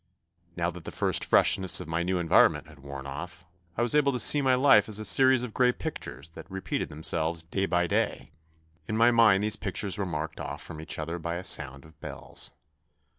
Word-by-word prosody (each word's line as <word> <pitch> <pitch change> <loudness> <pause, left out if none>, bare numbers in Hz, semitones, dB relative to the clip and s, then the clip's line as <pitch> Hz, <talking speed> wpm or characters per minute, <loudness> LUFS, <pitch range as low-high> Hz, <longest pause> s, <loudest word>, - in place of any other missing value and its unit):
Now 85 0 -1
that 90 -1 -12
the - - -6
first - - 0
freshness 95 -2 +3
of - - -8
my 80 +1 -2
new 90 +1 -1
environment 85 -2 +3
had 75 -1 -16
worn 70 0 -9
off, 85 +6 -8 0.3
I 120 - +1
was 120 - -1
able 145 -2 +3
to 125 - -2
see 145 +6 +5
my 130 -2 +3
life 125 -6 +4
as 105 - 0
a 110 - -4
series 130 +4 +4
of 120 -4 -6
grey 125 -1 +3
pictures 80 - -7
that 80 - -13
re 95 0 -6
peated - - -3
themselves 80 +2 -2
day 95 +4 -2
by 90 0 +1
day. - - -2 0.6
In 110 - -2
my 115 +2 +5
mind 110 -4 +4
these 105 0 +1
pictures 100 -1 -3
were 100 - -1
marked 75 -2 -5
off - - -6
from 80 - -8
each 80 - -5
other 80 +2 -4
by 85 +1 -4
a 90 - -5
sound 70 -5 0
of 80 -1 -19
bells. - - -8
90 Hz, 220 wpm, -27 LUFS, 80-110 Hz, 0.6 s, see